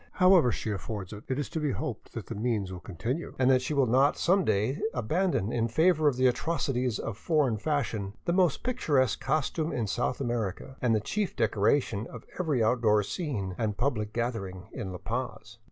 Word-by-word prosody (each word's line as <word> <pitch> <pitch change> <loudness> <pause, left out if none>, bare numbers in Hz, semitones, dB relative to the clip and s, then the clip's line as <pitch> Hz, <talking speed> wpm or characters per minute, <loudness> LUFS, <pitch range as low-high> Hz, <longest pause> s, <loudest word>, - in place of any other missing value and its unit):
However 180 -9 +5
she 110 - -3
affords 100 -1 -5
it, 105 - -10
it 130 - -1
is 145 - -2
to 160 - -3
be 150 -4 0
hoped 140 -8 -5
that 115 -5 -5
the - - -6
means 105 -4 -1
will 90 - -6
continue, 115 - -4
and 130 0 +4
that 130 -1 +4
she 150 +3 -2
will 140 -2 +4
not 130 +5 +3
some 190 +2 +3
day 110 +6 0
abandon 125 - 0
in 115 -1 +1
favor 155 +5 +3
of 140 - +3
the 130 +1 +2
atrocities 125 -3 0
of 115 -1 -5
foreign 145 -8 +2
fashions 110 -8 -2
the 170 - +1
most 180 -4 +2
picturesque 145 - +1
costume 155 +3 0
in 115 - -1
South 120 +4 -1
America, 120 -2 -3
and 120 -3 +3
the 110 - +1
chief 205 - -2
decoration 110 0 +1
of 120 - -10
every 150 -10 +1
outdoor 110 -2 +3
scene 105 - -3
and 105 -3 -1
public 110 -4 -1
gathering 100 -6 -3
in 105 -7 -5
La 90 - -5
Paz. 115 +2 -5
120 Hz, 195 wpm, -29 LUFS, 110-145 Hz, -, However